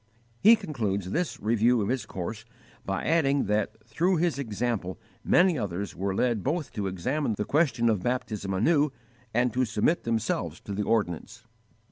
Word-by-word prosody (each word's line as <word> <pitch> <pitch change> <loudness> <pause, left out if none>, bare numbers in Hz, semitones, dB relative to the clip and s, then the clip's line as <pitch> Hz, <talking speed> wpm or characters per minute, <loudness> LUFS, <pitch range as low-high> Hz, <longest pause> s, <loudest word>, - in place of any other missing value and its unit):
He 220 +3 +8
concludes 100 - -3
this 175 - -1
review 115 +3 +3
of 100 - -1
his 125 -3 -1
course 105 +4 -5 0.4
by 95 0 -2
adding 145 -4 +2
that 105 +2 -1
through 175 +11 +1
his 165 -3 0
example 110 -6 -2 0.3
many 175 -5 +4
others 100 -1 -4
were 95 0 -2
led 115 -2 +1
both 150 +2 -2
to 105 -4 -2
examine 110 - -1
the 105 - -1
question 130 -5 +2
of 110 -5 +2
baptism 110 -4 -2
anew 145 - +3 0.4
and 120 0 +1
to 130 +2 +2
submit 125 +8 +1
themselves 115 -2 -1
to 100 - -6
the 100 - -1
ordinance. 110 +1 -1
115 Hz, 160 wpm, -27 LUFS, 100-140 Hz, 0.4 s, He